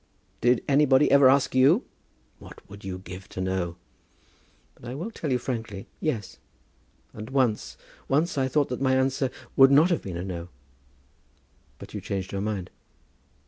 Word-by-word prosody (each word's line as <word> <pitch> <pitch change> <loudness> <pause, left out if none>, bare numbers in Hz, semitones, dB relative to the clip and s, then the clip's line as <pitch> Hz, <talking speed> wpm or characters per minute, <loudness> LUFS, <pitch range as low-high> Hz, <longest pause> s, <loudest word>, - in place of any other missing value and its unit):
"Did 120 0 +3
anybody 140 -1 +4
ever 140 -1 +7
ask 135 0 +3
you?" 140 - +4 0.5
"What - - -14
would 100 0 -12
you 95 -1 -5
give 95 0 -10
to - - -8
know? 95 -2 -2 1.0
But 120 - -11
I 125 - -5
will 180 +11 -5
tell 155 -9 -4
you 125 - +3
frankly; 110 -6 -5
yes. 115 -11 -3 0.7
And 110 +1 -8
once, 130 -5 0 0.3
once 155 +5 +1
I 135 -2 +1
thought 145 +2 +1
that 125 +1 -4
my 130 -1 +3
answer 130 0 +1 0.3
would 135 0 +8
not 150 +6 +5
have 170 - +1
been 90 -3 -6
a 90 - -4
'no.'" 90 -2 -6 1.3
"But - - -12
you - - -5
changed 95 -1 -4
your 100 - -3
mind?" 100 -3 -3
125 Hz, 165 wpm, -26 LUFS, 95-140 Hz, 1.3 s, would